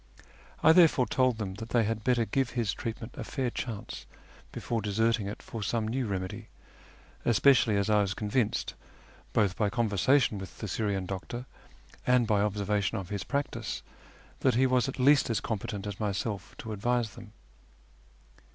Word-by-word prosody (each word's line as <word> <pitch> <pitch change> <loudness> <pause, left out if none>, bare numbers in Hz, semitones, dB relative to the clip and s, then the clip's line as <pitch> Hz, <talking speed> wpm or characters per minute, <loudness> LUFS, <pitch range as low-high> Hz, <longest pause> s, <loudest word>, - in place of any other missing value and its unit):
I 160 - +8
therefore 160 -6 +6
told 130 +1 +2
them 100 -4 -4
that 115 - -6
they 120 -2 +3
had 110 0 -2
better 120 -1 +2
give 130 +4 0
his 115 -6 -1
treatment 115 +1 -6
a - - -3
fair 130 -5 -2
chance 115 -3 -6 0.4
before 115 -2 -2
deserting 110 +1 +1
it 100 - -7
for 115 - -6
some 110 +2 -1
new 125 +2 -1
remedy, 95 -2 -4 0.8
especially 120 -2 +4
as 100 0 +1
I 105 -1 +4
was 100 -1 -1
convinced, 110 +1 0 0.6
both 100 -3 +2
by 105 -2 +1
conversa 115 +4 +3
tion 110 -5 0
with 95 -2 -9
the 110 - -5
Syrian 100 -1 -1
doctor, 100 +6 -5 0.6
and 125 -1 +4
by 105 -2 +2
observation 105 0 0
of 95 -4 -6
his 100 -3 -3
practice, 140 +9 -3 0.6
that 130 -3 +2
he 130 +2 +4
was 125 -3 +2
at - - -6
least 140 +1 +5
as 115 -4 +1
competent 105 -2 -4
as 100 -2 -5
myself 100 -1 -3
to 110 - -6
advise 120 +2 0
them. 110 -3 -12
110 Hz, 170 wpm, -29 LUFS, 100-120 Hz, 0.8 s, I